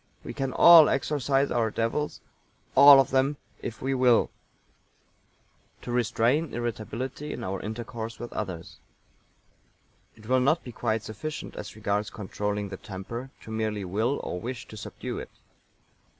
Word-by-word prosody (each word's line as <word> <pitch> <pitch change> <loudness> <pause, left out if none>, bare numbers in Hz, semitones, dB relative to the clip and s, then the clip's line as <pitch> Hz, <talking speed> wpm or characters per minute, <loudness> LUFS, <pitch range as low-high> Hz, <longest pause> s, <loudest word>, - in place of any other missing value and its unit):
We - - -6
can 135 -1 -2
all 165 +2 +8
exorcise 135 0 +1
our 115 -2 +1
devils 115 +7 -2 0.5
all 140 0 +10
of 135 - +2
them 135 +2 +2 0.2
if 115 - -6
we 135 +1 0
will. 125 -3 +3 1.5
To 120 - -5
restrain 125 +5 +1
irritability 120 +5 -4
in - - -6
our 95 0 -3
intercourse 110 +1 -6
with 120 +1 -8
others. 90 -5 -5 1.4
It 110 - -17
will 130 +3 +3
not 145 +6 +2
be 125 - -8
quite 110 -2 -1
sufficient 130 +9 -6
as - - -7
regards 100 +1 -1
controlling 105 0 -3
the 95 - -6
temper 110 +8 -7
to 110 - -10
merely 110 -2 -2
will, 110 +9 0
or 90 - -4
wish 125 +1 -6
to - - -10
subdue 105 - -6
it. - - -8
120 Hz, 145 wpm, -27 LUFS, 110-135 Hz, 1.5 s, all